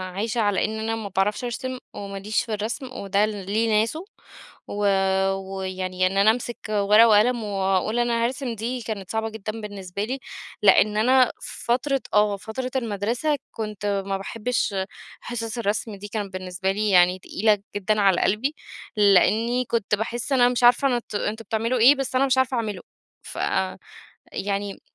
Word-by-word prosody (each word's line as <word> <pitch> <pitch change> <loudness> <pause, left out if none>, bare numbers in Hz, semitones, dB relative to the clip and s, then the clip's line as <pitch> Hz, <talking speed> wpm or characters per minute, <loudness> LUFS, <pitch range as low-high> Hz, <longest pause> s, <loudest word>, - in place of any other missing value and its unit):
عايشة 225 +3 -1
على 205 -2 +2
إن 220 +1 -4
أنا 225 +1 -1
ما 215 -3 -5
باعرفش 195 +5 0
أرسم، 255 +2 -4 0.2
وما 200 -1 -6
ليش 210 +2 -1
في 220 - -5
الرسم، 220 +5 -3
وده 200 +1 +1
ليه 215 +2 -1
ناسه. 310 - -2 0.6
و 205 0 -2 0.5
ويعني 185 -1 -2
إن 195 +1 -3
أنا 210 +2 +6
أمسِك 240 0 -4
ورقة 210 +2 +5
وقلم، 225 +2 +4
واقول 195 +2 0
أنا 235 -1 +1
هارسم 250 -1 -3
دي، 240 +3 -3
كانت 210 -4 -5
صعبة 220 0 -1
جدًا 220 +1 -6
بالنسبة 200 -2 -5
لي. 260 +5 -3 0.4
لإن 210 +1 +5
أنا 255 +3 +4
في - - -8
فترة 260 +3 +1
آه. 210 -1 +3
فترة 255 +5 -5
المدرسة 235 +5 -1
كنت 210 -2 -5 0.2
ما 195 0 -1
باحبش 230 +2 -2 0.5
حِصَص 230 -1 -5
الرسم 215 -1 -2
دي 200 +1 -8
كانت 205 -2 -4
بالنسبة 185 +1 -2
لي 210 +2 -1
يعني 180 -1 +5
تقيلة 210 +2 +1 0.2
جدًا 205 +1 +1
على 195 -3 +4
قلبي، 240 +10 +1 0.4
لإنّي 220 +5 +4
كنت 220 -3 0
باحس 235 +5 -4
أنا 245 -2 +5
مش 245 0 -1
عارفة 245 +1 +5
نت 230 -3 -8
أنتم 220 +2 -2
بتعملوا 230 +4 0
إيه، 265 +6 +7
بس 270 -1 -4
أنا 265 - +4
مش 260 -1 +2
عارفة 260 -1 +1
أعمله. 210 -5 -3 0.4
فأ 95 0 -2 0.6
يعني 200 0 -3
215 Hz, 165 wpm, -24 LUFS, 200-240 Hz, 0.6 s, إيه